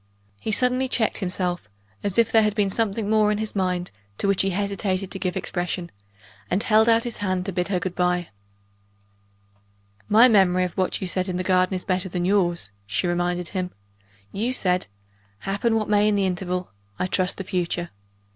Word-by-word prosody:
He 220 - -3
suddenly 250 +3 +1
checked 235 -4 0
himself, 180 - -2 0.3
as 200 0 -1
if 230 -2 +4
there 225 - +6
had 210 -1 +1
been 205 -2 +1
something 220 0 0
more 215 0 +3
in 210 - 0
his 215 0 -4
mind 180 -2 -1 0.3
to - - 0
which 195 -1 +3
he 195 - +1
hesitated 195 -1 -2
to 195 - -4
give 185 -1 -2
expression 175 -1 -3 0.6
and 195 - +1
held 220 +1 +4
out 230 0 +4
his 240 -2 -4
hand 185 -2 -1
to 195 - -2
bid 180 -1 -1
her 190 -3 0
good 180 0 -3
by. 180 -1 0 1.8
"My 225 +4 +8
memory 190 -5 +4
of 180 - -2
what 185 -1 -1
you - - -2
said 185 +1 -1
in 180 - -2
the 185 - -1
garden 185 0 +2
is 185 - -4
better 185 0 -1
than 175 0 -2
yours," 175 - +1 0.2
she 105 - -1
reminded 175 0 -1
him. 185 -2 -3 0.6
"You 230 +6 -1
said 180 -6 +1 0.5
'Happen 200 +4 0
what 215 -1 0
may 210 0 +3
in 210 - +3
the 200 -1 +2
interval, 180 0 -2 0.3
I - - 0
trust 185 0 0
the 195 - -4
future. 175 -1 -2
190 Hz, 195 wpm, -24 LUFS, 180-210 Hz, 1.8 s, My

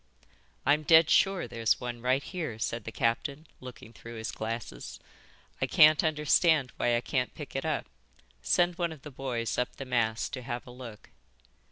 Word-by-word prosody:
"I'm 145 +3 +4
dead 160 +1 +6
sure 195 -7 +3
there's 115 -1 +1
one 120 -1 -5
right 130 +3 +1
here," 160 - -5
said 115 0 -3
the 115 - -5
captain, 140 +7 -1
looking 125 -3 -11
through 115 +1 -10
his 110 0 -4
glasses. 110 - -6 0.6
"I - - +2
can't 155 -1 +6
understand 150 -2 +3
why 120 - +2
I - - -1
can't 125 -1 -2
pick 145 -3 -9
it 135 - -2
up. 155 -3 -1 0.6
Send 175 - +2
one 170 -1 0
of 155 -4 -11
the 150 - -9
boys 120 -6 -3
up 125 - -2
the 135 - -7
mast 115 -3 0
to 130 - -4
have 120 -1 -5
a 125 - -11
look." 120 -4 -11
130 Hz, 180 wpm, -29 LUFS, 115-150 Hz, 0.6 s, dead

